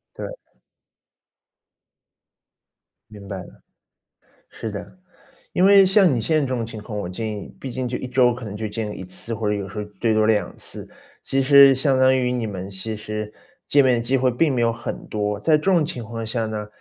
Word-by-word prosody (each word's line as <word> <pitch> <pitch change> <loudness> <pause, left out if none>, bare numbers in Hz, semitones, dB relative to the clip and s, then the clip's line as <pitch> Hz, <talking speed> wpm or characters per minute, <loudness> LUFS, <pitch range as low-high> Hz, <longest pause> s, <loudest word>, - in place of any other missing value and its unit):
对。 - - -6 2.7
明 100 -2 -12
白 95 - -5
了。 90 - -12 0.9
是 110 - -6
的， 100 - -8 0.5
因 185 - +3
为 200 -1 +7
像 190 -4 +4
你 115 - 0
现 160 +8 0
在 - - 0
这 140 - -1
种 125 -3 -2
情 110 -2 -8
况， 105 -1 -6
我 100 - -3
建 110 +5 -4
议， 100 - -9
毕 130 - -6
竟 130 0 -3
就 125 - -3
1 - - -6
周 125 -1 +3
可 120 -1 -8
能 105 -1 -6
就 110 0 -3
见 105 0 -5
1 95 - -7
次， 95 +5 -4
或 110 -1 -2
者 105 - +2
有 100 -2 -3
时 100 - -10
候 105 - -2 0.2
最 115 -2 +2
多 110 0 +3
2 110 -1 +1
次， - - -4 0.3
其 135 - 0
实 140 0 +7
相 135 0 +2
当 130 0 +5
于 125 -1 0
你 120 -3 -2
们 95 -2 -6
其 100 +3 -5
实 105 0 -5 0.4
见 140 -1 +5
面 130 -2 +4
的 115 - -1
机 130 +3 +1
会 130 0 +2
并 145 +4 +1
没 120 - 0
有 115 0 +3
很 115 +1 -6
多。 105 -1 -2
在 155 +4 +3
这 150 - -8
种 180 -5 +3
情 150 -7 -5
况 115 +1 -6
下 115 +1 -2
呢， 105 -1 -4
115 Hz, 220 characters per minute, -22 LUFS, 105-130 Hz, 2.7 s, 为